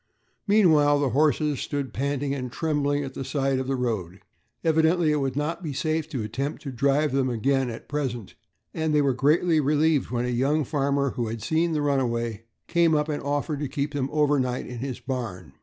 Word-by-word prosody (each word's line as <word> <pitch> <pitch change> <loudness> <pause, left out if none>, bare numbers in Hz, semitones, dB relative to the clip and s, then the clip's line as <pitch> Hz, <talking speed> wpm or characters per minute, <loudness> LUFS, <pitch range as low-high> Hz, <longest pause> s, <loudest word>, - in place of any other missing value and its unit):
Meanwhile 160 -9 +5
the 140 -2 +1
horses 150 +1 +2
stood 140 -2 -3
panting 140 +1 -1
and 125 -3 -4
trembling 145 0 0
at 135 -1 -6
the 135 - -5
side 135 -1 0
of 130 - -3
the 135 - 0
road. 105 -8 -3 0.4
Evidently 160 0 +3
it 150 - +2
would 135 -2 -1
not 160 +4 -2
be 155 -5 -4
safe 155 +1 -1
to 130 -8 -3
attempt 130 +7 -4
to 140 - -5
drive 140 +4 +1
them 135 -1 +1
again 130 +2 +1
at 115 - -8
present, 130 -8 -3 0.4
and 160 -1 0
they 150 - +5
were 135 -2 +2
greatly 155 +5 +3
relieved 150 0 +2
when 120 0 -1
a - - -1
young 135 +6 +1
farmer, 140 0 0
who 120 -2 -2
had 110 -1 -5
seen 160 +6 +1
the 150 -1 0
runaway, 120 -5 -1 0.2
came 170 -2 +3
up 150 +1 0
and 150 - -2
offered 145 +1 -2
to 145 - -2
keep 140 +2 -3
them 140 -2 -1
overnight 145 -4 +1
in 125 -1 -7
his 130 -1 -4
barn. 115 - -5
140 Hz, 200 wpm, -25 LUFS, 130-150 Hz, 0.4 s, Meanwhile